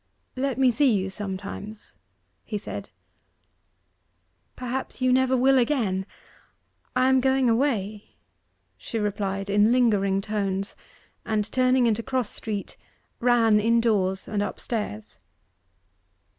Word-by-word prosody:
'Let 265 0 -1
me 260 -2 +4
see 265 +3 +3
you 190 -3 0
sometimes,' 200 +2 -7 0.5
he 210 - -4
said. 205 - -7 1.7
'Perhaps 255 +1 -4
you 255 -1 +3
never 260 0 +3
will 265 +1 +4
again 220 -8 0 0.9
I 255 +1 +3
am 265 0 +4
going 265 0 +2
away,' 225 -4 -1 0.6
she 230 - -5
replied 200 -2 -2
in 205 +2 +3
lingering 205 -6 +3
tones; 195 -1 -2 0.5
and 215 -1 0
turning 255 -1 +3
into 230 -1 +1
Cross 255 -2 -2
Street, 210 -3 -5 0.4
ran 230 -3 +4
indoors 215 -4 +1
and 210 -1 -1
upstairs. 205 - -4
220 Hz, 110 wpm, -25 LUFS, 200-255 Hz, 1.7 s, me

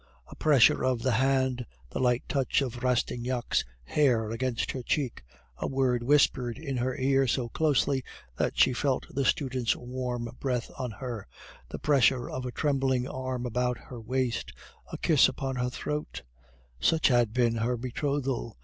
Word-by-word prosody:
A - - -9
pressure 145 -6 +4
of 125 -3 0
the 130 - +2
hand, 130 0 +1 0.2
the - - -3
light 125 -1 +2
touch 140 0 +1
of 125 -2 -5
Rastignac's 125 0 0 0.2
hair 115 - +2
against 120 0 -1
her 130 - -5
cheek, 130 0 -1 0.4
a - - -2
word 130 -3 +1
whispered 125 -2 +2
in 140 -3 -4
her 125 +1 -1
ear 135 0 +2
so 120 -1 0
closely 140 -2 +1 0.3
that - - -1
she 130 - +5
felt 130 +1 0
the 140 - 0
student's 130 -3 +1
warm 125 -1 -4
breath 125 -3 -2
on 130 -2 -3
her, 115 - -6 0.4
the - - -5
pressure 135 -3 +3
of 130 0 -4
a - - -4
trembling 135 -3 0
arm 130 -2 -4
about 125 +1 0
her 125 - -10
waist, 125 +1 -2 0.4
a - - -4
kiss 155 -5 +5
upon 135 -1 -3
her 125 0 0
throat 150 - -4 0.6
such 160 - +3
had 120 -3 +3
been 120 -1 +2
her 120 +2 0
betrothal. 130 -2 -2
125 Hz, 160 wpm, -28 LUFS, 120-135 Hz, 0.6 s, she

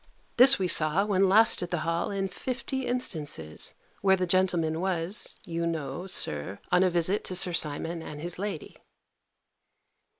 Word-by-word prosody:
This 255 +2 +8
we 185 - -1
saw, 165 +4 +2
when 195 -2 +2
last 220 +3 +6
at 175 - -4
the 175 -3 -2
Hall, 165 0 -1
in 195 -1 -2
fifty 260 +5 -5
instances, 150 - -3 0.3
where 190 -1 +4
the 185 -1 -1
gentleman 175 -3 0
was, 185 0 -2
you 170 0 -3
know, 160 +1 -4
Sir, 85 - -2
on 180 - +4
a 190 - +3
visit 175 +3 +1
to 185 - -4
Sir 180 -1 +3
Simon 165 +2 -1
and 150 -2 -8
his 175 +2 -3
lady. 195 -6 -5
180 Hz, 160 wpm, -27 LUFS, 160-195 Hz, 0.3 s, This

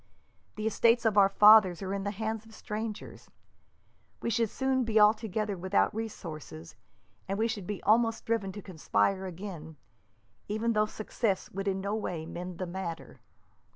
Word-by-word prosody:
The 215 - -4
estates 230 +2 +3
of 220 -2 +3
our 195 -1 +6
fathers 205 -3 +6
are 190 0 -3
in 200 -1 -3
the - - 0
hands 220 +1 -3
of 220 0 -16
strangers. 215 0 -6 0.9
We 235 - -2
should 230 0 +1
soon 265 +1 0
be 220 -2 +2
altogether 215 -1 +2
without 185 +4 +1
resources, 160 - -7 0.5
and 195 +1 -2
we 225 +2 +2
should 210 -5 -5
be 205 -2 -5
almost 225 +1 +2
driven 220 -4 -1
to 205 - -8
conspire 190 +2 0
again, 170 -4 -8 0.7
even 220 +3 0
though 215 0 +2
success 215 -2 -2
would 195 +1 -4
in 190 -1 0
no 200 +2 -2
way 180 -7 -3
mend 175 +1 -7
the 185 - -3
matter. 170 -2 -6
205 Hz, 160 wpm, -29 LUFS, 190-220 Hz, 0.9 s, our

